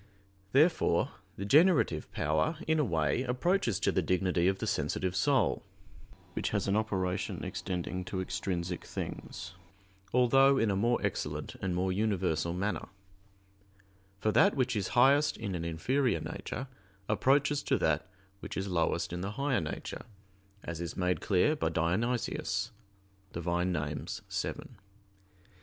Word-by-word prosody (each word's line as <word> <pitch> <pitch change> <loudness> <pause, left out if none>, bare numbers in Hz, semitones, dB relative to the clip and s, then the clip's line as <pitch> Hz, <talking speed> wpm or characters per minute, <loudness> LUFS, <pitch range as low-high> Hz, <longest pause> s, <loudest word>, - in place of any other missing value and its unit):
Therefore 145 - +3 0.2
the 100 - -5
generative 150 - +4
power, 80 - 0
in 160 0 +3
a - - +4
way, 80 - +1
approaches 130 - +1
to - - +3
the - - +1
dignity 90 -1 +1
of 95 0 +2
the - - -3
sensitive 90 -1 -1
soul, 135 +3 +2 0.7
which - - -1
has - - -1
an 100 - +2
operation 95 -4 -1
extending 90 0 -3
to 95 +1 -3
extrinsic 90 -1 -3
things, 90 -3 -6 0.6
although 135 +2 +5
in 115 -5 +2
a - - 0
more 120 +5 +2
excellent - - -2
and 95 -2 -1
more 95 +1 +1
universal 90 -5 0
manner; 100 +4 -2 1.3
for 110 +2 +1
that 200 - +5
which 130 -2 +1
is 100 -3 0
highest 140 +4 +5
in 100 -4 -4
an 85 -2 -3
inferior 120 - +1
nature 135 - -5 0.4
approaches 140 +6 +2
to - - +1
that - - +1 0.3
which - - -7
is 95 0 -2
lowest 85 -1 0
in 90 - -3
the 100 +2 -3
higher 135 -3 0
nature, 75 - -5 0.6
as 85 -1 -5
is 85 - -5
made 90 -1 0
clear 105 +10 +3
by 150 - 0
Dionysius 95 +3 -1 0.6
(Div. 85 0 -5
Nom. 85 -4 -1 0.3
vii). - - -2
95 Hz, 140 wpm, -31 LUFS, 90-125 Hz, 1.3 s, although